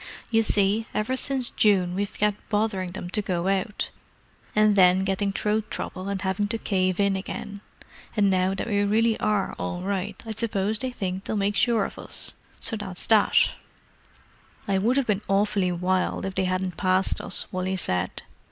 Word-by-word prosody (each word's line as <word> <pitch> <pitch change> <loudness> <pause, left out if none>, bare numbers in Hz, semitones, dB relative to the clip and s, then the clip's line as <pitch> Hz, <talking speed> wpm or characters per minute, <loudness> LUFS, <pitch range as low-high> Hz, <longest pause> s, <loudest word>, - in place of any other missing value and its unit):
You 225 -1 +4
see, 210 +1 +2
ever 225 +5 0
since 260 -1 +1
June 190 -4 +3
we've 200 +2 -2
kept 210 0 -1
bothering 205 -4 0
them 180 - -6
to 210 - +1
go 180 -2 -2
out, 195 +2 -1 0.6
and 215 -1 +5
then 185 -1 +5
getting 195 +1 0
throat 210 +2 -1
trouble 185 +2 -5
and 200 -1 -2
having 195 +2 0
to 230 +2 -1
cave 185 -4 0
in 200 -1 +3
again; 200 +1 -6 0.6
and 205 -1 +4
now 185 0 +2
that - - -3
we 205 -2 +1
really 220 +2 +3
are 210 -2 0
all 175 - -3
right 195 0 -2
I 225 - -5
suppose 215 -1 -1
they 260 - -1
think 190 -5 -4
they'll 215 - -1
make 200 0 0
sure 230 -3 +3
of - - -8
us. - - 0 0.3
So 225 - -1
that's 190 -4 -6
that." 215 -2 +4 1.2
"I 195 -1 +2
would 235 +7 +2
have 275 - +2
been 210 -3 0
awfully 195 -1 +2
wild 180 +2 0
if 195 - -3
they 190 0 0
hadn't 185 -1 -2
passed 185 0 +2
us," 195 - -2
Wally 185 0 -1
said. 90 - -2
200 Hz, 180 wpm, -25 LUFS, 185-215 Hz, 1.2 s, and